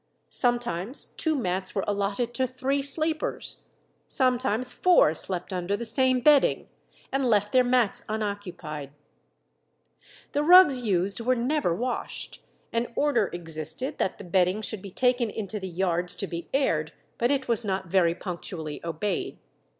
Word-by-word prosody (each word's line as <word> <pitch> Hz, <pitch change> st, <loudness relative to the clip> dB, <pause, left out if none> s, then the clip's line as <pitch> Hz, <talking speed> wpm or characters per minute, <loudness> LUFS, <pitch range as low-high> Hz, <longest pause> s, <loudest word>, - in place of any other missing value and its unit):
Sometimes 240 Hz, -, 0 dB
two 315 Hz, -2 st, -1 dB
mats 190 Hz, -6 st, -2 dB
were 195 Hz, -, 0 dB
allotted 205 Hz, +4 st, -1 dB
to 260 Hz, 0 st, 0 dB
three 260 Hz, +2 st, -1 dB
sleepers. 310 Hz, +3 st, -1 dB, 0.5 s
Sometimes 255 Hz, -2 st, +2 dB
four 350 Hz, -, +4 dB
slept 180 Hz, +3 st, -3 dB
under 180 Hz, +2 st, -1 dB
the 235 Hz, -, -5 dB
same 255 Hz, +2 st, +2 dB
bedding, 290 Hz, +1 st, +4 dB, 0.4 s
and 270 Hz, 0 st, 0 dB
left 210 Hz, -4 st, +2 dB
their 255 Hz, -1 st, +5 dB
mats 245 Hz, -4 st, +1 dB
unoccupied. 185 Hz, -9 st, -5 dB, 1.4 s
The 290 Hz, -, 0 dB
rugs 315 Hz, -5 st, +7 dB
used 195 Hz, -1 st, 0 dB
were 255 Hz, +2 st, +2 dB
never 245 Hz, -, 0 dB
washed; 245 Hz, +6 st, -4 dB, 0.3 s
an 230 Hz, +1 st, 0 dB
order 260 Hz, -9 st, +2 dB
existed 165 Hz, -, -3 dB
that 190 Hz, -, -1 dB
the -, -, -9 dB
bedding 185 Hz, +3 st, +1 dB
should 215 Hz, -2 st, -4 dB
be 200 Hz, -, -8 dB
taken 245 Hz, +3 st, +1 dB
into 210 Hz, 0 st, -4 dB
the 190 Hz, -1 st, -6 dB
yards 175 Hz, 0 st, 0 dB
to -, -, -3 dB
be 170 Hz, -2 st, -7 dB
aired, 275 Hz, 0 st, 0 dB, 0.3 s
but 240 Hz, -, +2 dB
it 270 Hz, -1 st, 0 dB
was 235 Hz, 0 st, +2 dB
not 190 Hz, -2 st, -2 dB
very 170 Hz, -1 st, +2 dB
punctually 170 Hz, -4 st, -6 dB
obeyed. 170 Hz, +4 st, -3 dB
215 Hz, 145 wpm, -26 LUFS, 185-255 Hz, 1.4 s, rugs